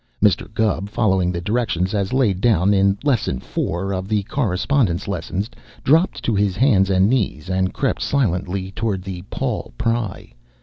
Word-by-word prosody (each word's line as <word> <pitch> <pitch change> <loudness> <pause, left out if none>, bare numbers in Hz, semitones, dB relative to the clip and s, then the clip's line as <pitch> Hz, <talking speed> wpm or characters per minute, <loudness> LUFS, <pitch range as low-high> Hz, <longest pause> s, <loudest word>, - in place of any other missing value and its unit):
Mr. 105 -1 +2
Gubb, 105 -2 0
following 95 -5 +1
the 85 -1 -3
directions 100 -3 0
as 100 -2 -1
laid 110 -8 +1
down 100 -4 +3
in 100 0 +3
Lesson 120 - +1
Four 95 +8 -3
of 95 0 -3
the 105 -1 0
Correspondence 105 -3 0
Lessons, 100 +1 -3 0.4
dropped 165 +7 +3
to 115 - 0
his 100 -2 +1
hands 105 -8 +4
and 95 0 +4
knees 100 - -1
and 95 0 +1
crept - - -1
silently 95 -7 -1
toward 100 -3 -2
the 95 -2 -6
"Paul - - -3
Pry." 115 - -2
100 Hz, 160 wpm, -21 LUFS, 95-115 Hz, 0.4 s, hands